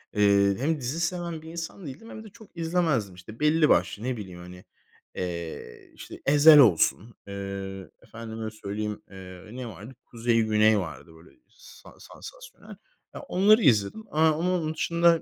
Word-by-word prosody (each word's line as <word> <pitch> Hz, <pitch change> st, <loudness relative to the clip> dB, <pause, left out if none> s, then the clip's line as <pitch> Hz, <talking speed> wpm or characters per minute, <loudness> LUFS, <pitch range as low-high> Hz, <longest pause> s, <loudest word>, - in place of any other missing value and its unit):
eee, 100 Hz, -1 st, +4 dB
hem 155 Hz, +3 st, 0 dB
dizi 135 Hz, +6 st, -4 dB
seven 170 Hz, -2 st, -3 dB
bir 160 Hz, -, -11 dB
insan 170 Hz, +2 st, -7 dB
değildim 145 Hz, -, -10 dB
hem 220 Hz, -, -9 dB
de 215 Hz, -, -12 dB
çok 215 Hz, -4 st, -18 dB
izlemezdim. 160 Hz, -, 0 dB
İşte, 105 Hz, +5 st, -13 dB
belli 150 Hz, +1 st, +3 dB
başlı, 90 Hz, +5 st, +1 dB
ne 125 Hz, -1 st, -2 dB
bileyim, 90 Hz, -4 st, -9 dB
hani, 90 Hz, +1 st, -12 dB, 0.5 s
eee, 85 Hz, -8 st, -6 dB
işte, -, -, -11 dB
Ezel 150 Hz, +2 st, +7 dB
olsun, 110 Hz, -, +3 dB
eee, 100 Hz, -1 st, -6 dB
efendime 110 Hz, -1 st, -8 dB
söyleyeyim, 105 Hz, 0 st, -5 dB
eee, 95 Hz, -1 st, -11 dB
ne 125 Hz, -1 st, -7 dB
vardı? 105 Hz, +5 st, -10 dB
Kuzey 115 Hz, -1 st, 0 dB
Güney 110 Hz, -1 st, +3 dB
vardı, 80 Hz, -1 st, -8 dB
böyle, 80 Hz, +2 st, -18 dB, 0.2 s
sa -, -, -17 dB
sansasyonel. -, -, -13 dB, 0.4 s
Ya, -, -, -8 dB
onları 215 Hz, -3 st, +3 dB
izledim, 115 Hz, -, +2 dB
aaa, 155 Hz, +1 st, +3 dB
ama 180 Hz, +2 st, 0 dB
onun 160 Hz, -2 st, -2 dB
dışında 170 Hz, +1 st, +2 dB
115 Hz, 160 wpm, -26 LUFS, 100-165 Hz, 0.5 s, Ezel